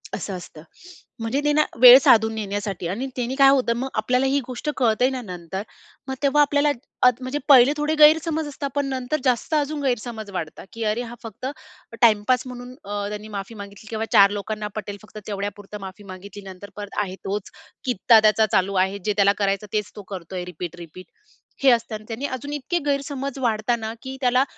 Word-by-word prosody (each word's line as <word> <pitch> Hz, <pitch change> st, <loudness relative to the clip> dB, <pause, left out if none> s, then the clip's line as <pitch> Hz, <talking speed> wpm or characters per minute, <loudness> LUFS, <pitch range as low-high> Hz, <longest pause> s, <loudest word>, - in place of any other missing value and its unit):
असं 200 Hz, -, -5 dB
असतं 160 Hz, -3 st, -11 dB, 0.6 s
म्हणजे 225 Hz, +5 st, -1 dB
ते 295 Hz, -, +3 dB
ना, 305 Hz, 0 st, +4 dB, 0.2 s
वेळ 250 Hz, 0 st, +12 dB
साधून 220 Hz, -3 st, +4 dB
नेण्यासाठी. 200 Hz, -3 st, -3 dB
आणि 220 Hz, +10 st, -3 dB
त्याने 250 Hz, +1 st, -2 dB
काय 275 Hz, -1 st, +7 dB
होतं, 260 Hz, -4 st, +3 dB
मग 265 Hz, +2 st, -3 dB
आपल्याला 250 Hz, +5 st, +1 dB
ही 275 Hz, +1 st, +2 dB
गोष्ट 255 Hz, +4 st, -4 dB
कळते 245 Hz, 0 st, +3 dB
ना 260 Hz, -2 st, -4 dB
नंतर 180 Hz, -1 st, -6 dB, 0.4 s
मग 265 Hz, -, -3 dB
तेव्हा 285 Hz, +1 st, +4 dB
आपल्याला 290 Hz, 0 st, +3 dB, 0.4 s
अद 250 Hz, -, +4 dB
म्हणजे 255 Hz, +3 st, -3 dB
पहिले 265 Hz, +1 st, +8 dB
थोडे 300 Hz, +1 st, 0 dB
गैरसमज 315 Hz, +1 st, +5 dB
असतात, 280 Hz, 0 st, -5 dB
पण 285 Hz, -1 st, +1 dB
नंतर 260 Hz, +3 st, -2 dB
जास्त 255 Hz, +4 st, 0 dB
अजून 295 Hz, 0 st, -1 dB
गैरसमज 235 Hz, -4 st, -2 dB
वाढता, 165 Hz, -3 st, -6 dB
की 230 Hz, -, -5 dB
अरे 215 Hz, +3 st, 0 dB
हा 240 Hz, 0 st, -8 dB
फक्त 225 Hz, +3 st, -8 dB, 0.6 s
टाइमपास 230 Hz, +2 st, +4 dB
म्हणून 250 Hz, 0 st, -8 dB
अ, 205 Hz, 0 st, -3 dB
त्यांनी 210 Hz, +1 st, -6 dB
माफी 205 Hz, +1 st, -6 dB
मागितली 200 Hz, +1 st, -10 dB
किंवा 225 Hz, 0 st, -2 dB
4 200 Hz, -2 st, +7 dB
लोकांना 210 Hz, +1 st, -4 dB
पटेल 205 Hz, -1 st, -5 dB
फक्त 215 Hz, -, -14 dB
तेवढ्यापुरतं 205 Hz, 0 st, -5 dB
माफी 190 Hz, +2 st, -9 dB
मागितली. 200 Hz, +2 st, -10 dB
नंतर 190 Hz, +1 st, -10 dB
परत 205 Hz, -1 st, -8 dB
आहे 185 Hz, -2 st, -6 dB
तोच 200 Hz, 0 st, -3 dB, 0.4 s
कित्ता 235 Hz, -2 st, +5 dB
त्याचा 215 Hz, 0 st, +4 dB
चालू 190 Hz, +1 st, +2 dB
आहे. 195 Hz, +1 st, -5 dB
जे 210 Hz, -, +1 dB
त्याला 200 Hz, 0 st, +5 dB
करायचं 200 Hz, +1 st, 0 dB
तेच 210 Hz, -1 st, -1 dB
तो 205 Hz, -, -9 dB
करतो 185 Hz, 0 st, -7 dB
आहे 180 Hz, -1 st, -3 dB
रिपीट-रिपीट. 175 Hz, 0 st, -8 dB, 0.6 s
हे 270 Hz, -, +7 dB
असताना 225 Hz, -2 st, -1 dB
त्याने 235 Hz, +4 st, -4 dB
अजून 285 Hz, +4 st, -7 dB
इतके 295 Hz, +5 st, -2 dB
गैरसमज 280 Hz, -1 st, -2 dB
वाढता 230 Hz, -1 st, +1 dB
ना, 220 Hz, -1 st, -5 dB
की 265 Hz, 0 st, -6 dB
त्याला 250 Hz, 0 st, +3 dB
225 Hz, 190 wpm, -23 LUFS, 200-265 Hz, 0.6 s, वेळ